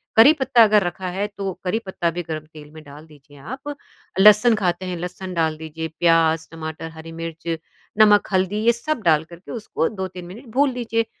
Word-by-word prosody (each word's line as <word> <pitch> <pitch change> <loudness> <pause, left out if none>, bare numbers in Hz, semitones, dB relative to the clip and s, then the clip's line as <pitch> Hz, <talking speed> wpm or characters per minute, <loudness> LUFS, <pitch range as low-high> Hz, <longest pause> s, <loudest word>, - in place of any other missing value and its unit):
करी 245 +8 +8
पत्ता 245 -3 +5
अगर 210 -2 +4
रखा 175 +1 -4
है 195 +3 -2
तो 195 -2 -3
करी 190 +5 0
पत्ता 175 -2 -1
भी 175 +2 -4
गर्म 155 -1 -5
तेल 150 -1 -12
में 155 0 -12
डाल 145 +2 -13
दीजिए 145 -1 -18
आप। 265 - -7 0.4
लहसुन 210 +3 +7
खाते 185 -2 -1
हैं, 180 -1 -4
लहसुन 180 +1 -6
डाल 160 -2 0
दीजिए, 160 +1 -6
प्याज़, 165 -1 +3
टमाटर, 160 0 -6
हरी 160 0 -10
मिर्च, 165 0 -7 0.5
नमक, 210 -1 +6
हल्दी 190 +3 +1
ये 235 - +7
सब 245 +2 -3
डाल 160 -2 +4
करके 170 +2 -13
उसको 220 -8 -2
2-3 185 -3 -6
मिनट 220 +10 -11
भून 280 0 +3
लीजिए। 230 -2 -1
180 Hz, 195 wpm, -22 LUFS, 160-215 Hz, 0.5 s, करी